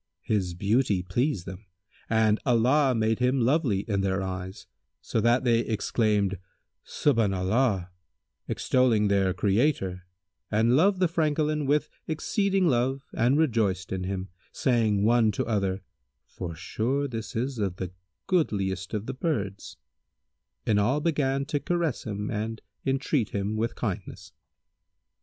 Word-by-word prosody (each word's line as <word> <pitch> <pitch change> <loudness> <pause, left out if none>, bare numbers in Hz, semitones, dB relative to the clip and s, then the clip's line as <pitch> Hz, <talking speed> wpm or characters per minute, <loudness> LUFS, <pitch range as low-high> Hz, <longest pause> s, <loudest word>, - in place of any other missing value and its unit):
His 95 -5 -1
beauty 100 0 +1
pleased 110 - -1
them 95 +3 -9 0.4
and 110 -1 +3
Allah 130 +2 +3
made 110 0 +1
him 125 +2 +2
lovely 125 - +2
in 100 -2 -1
their 95 0 0
eyes, 95 0 -6 0.3
so 110 - -1
that 120 +3 +3
they 120 -2 +3
exclaimed 105 -4 0 0.4
"Subhбna 110 -9 +1
'llбh," 105 -3 +1 0.6
extolling 115 -5 +2
their 95 -2 +2
Creator 95 -5 0 0.4
and 115 +3 +3
loved 185 +6 +3
the 180 - +5
Francolin 155 -2 0
with 150 +2 +2 0.2
exceeding 195 +4 +1
love 135 0 +1
and 125 +5 +2
rejoiced 110 - +1
in 95 -1 -2
him, 95 0 -4 0.2
saying 110 -5 +1
one 115 0 +4
to - - -1
other, 100 -3 -1 0.4
"Forsure 110 - -3
this 115 -4 -6
is 125 +2 -2
of 95 -4 -1
the 90 -1 -5 0.3
goodliest 100 - 0
of 105 0 -3
the 135 - -4
birds;" 105 - -3 0.9
and 105 -1 +3
all 125 +8 +2
began 140 -4 0
to 145 +1 -1
caress 170 -4 -1
him 105 -1 -4
and 110 +1 -3 0.3
entreat 135 -3 0
him 100 +2 -1
with 115 +2 -1
kindness. 95 -4 -5
110 Hz, 135 wpm, -27 LUFS, 100-135 Hz, 0.9 s, the